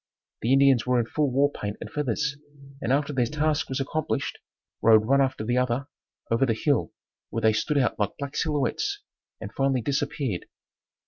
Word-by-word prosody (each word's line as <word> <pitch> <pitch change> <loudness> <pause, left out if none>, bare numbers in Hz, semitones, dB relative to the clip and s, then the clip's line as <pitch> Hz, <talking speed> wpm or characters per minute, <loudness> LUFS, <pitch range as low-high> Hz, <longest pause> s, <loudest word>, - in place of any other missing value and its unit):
The 115 - 0
Indians 135 -3 +5
were 125 -1 +3
in 115 - +1
full 145 +4 0
war 140 +3 +2
paint 105 -5 -5
and - - -6
feathers 150 0 -1 0.5
and 120 - -1
after 145 +2 +1
their 125 -3 +1
task 150 +2 0
was 130 - -2
accomplished, 155 +3 -2 0.4
rode 110 -1 +6
one 135 +4 +4
after 130 -5 0
the 120 +3 +1
other 125 +3 -1 0.4
over 115 +3 +3
the 115 - +1
hill 145 +5 +1 0.4
where 115 - -3
they 110 0 +5
stood 145 +7 0
out 125 -5 +1
like 105 -1 -1
black 140 0 -6
silhouettes, 165 - -1 0.4
and - - -8
finally 135 -2 +1
disappeared. 140 - -2
135 Hz, 180 wpm, -26 LUFS, 120-145 Hz, 0.5 s, rode